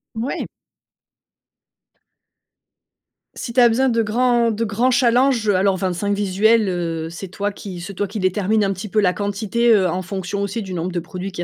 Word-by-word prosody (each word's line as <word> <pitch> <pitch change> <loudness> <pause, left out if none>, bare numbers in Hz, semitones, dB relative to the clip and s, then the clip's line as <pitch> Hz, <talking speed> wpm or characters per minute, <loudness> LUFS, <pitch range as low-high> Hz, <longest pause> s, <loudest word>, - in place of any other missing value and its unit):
Ouais. 230 +5 -3 2.9
Si 235 - -6
tu 255 - +2
as 240 - +8
besoin 260 +4 +2
de 230 -1 +2
grands 235 +1 +2
de 225 +1 -1
grands 225 +5 +1
challenges, 245 -1 +3
heu, 205 - +3
alors 190 +1 +2
25 190 +2 -1
visuels, 205 +3 +2
heu, 165 -3 -3
c'est 180 +3 -7
toi 200 +3 -3
qui 195 -3 -8
c'est 175 +3 -7
toi 200 +2 -2
qui 200 +3 -6
détermine 205 +3 +1
un 195 0 +1
petit 190 +3 -7
peu 215 - +1
la 180 -3 +3
quantité, 210 +4 -1
heu, 195 -4 +4
en 180 +2 -2
fonction 190 +1 -4
aussi 200 +3 -3
du 190 -2 -7
nombre 175 +1 -3
de 175 - -2
produits 185 +3 -6
qu'il 175 -2 -4
200 Hz, 190 wpm, -20 LUFS, 185-230 Hz, 2.9 s, as